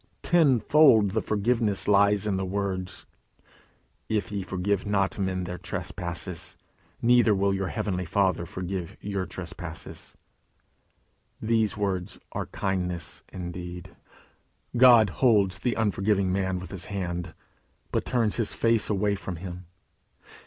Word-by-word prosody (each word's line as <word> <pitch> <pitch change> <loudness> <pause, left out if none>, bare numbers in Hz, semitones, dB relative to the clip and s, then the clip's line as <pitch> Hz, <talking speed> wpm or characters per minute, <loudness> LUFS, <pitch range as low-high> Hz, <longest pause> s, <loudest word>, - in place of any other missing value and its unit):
Tenfold 135 - +5
the 110 +2 0
forgiveness 110 -1 0
lies 100 0 +4
in 105 -2 0
the 95 - -1
words, 95 -1 -3 1.0
"If 110 0 -1
ye 100 -1 -2
forgive 95 +1 -1
not 100 -1 0
men 95 -1 -1
their 90 0 -5
trespasses, 85 -3 -4 0.5
neither 120 -3 +5
will 100 0 +2
your 95 -1 -1
heavenly 95 -2 -2
Father 90 -1 +1
forgive 90 -1 -5
your 100 -2 -3
trespasses." 85 -2 -8 1.2
Those 110 -2 +1
words 95 -3 -2
are - - -4
kindness 90 -3 -2
indeed. 90 0 -7 0.8
God 120 -5 +7
holds 105 -7 +4
the 125 - 0
unforgiving 100 -3 +1
man 95 -1 0
with 90 -1 -8
his 95 -3 -3
hand, 90 -4 -4 0.6
but - - 0
turns 115 -4 0
his 115 -3 0
face 115 -2 +2
away 105 0 +1
from 95 -2 -5
him. 90 0 -8
100 Hz, 125 wpm, -27 LUFS, 90-105 Hz, 1.2 s, God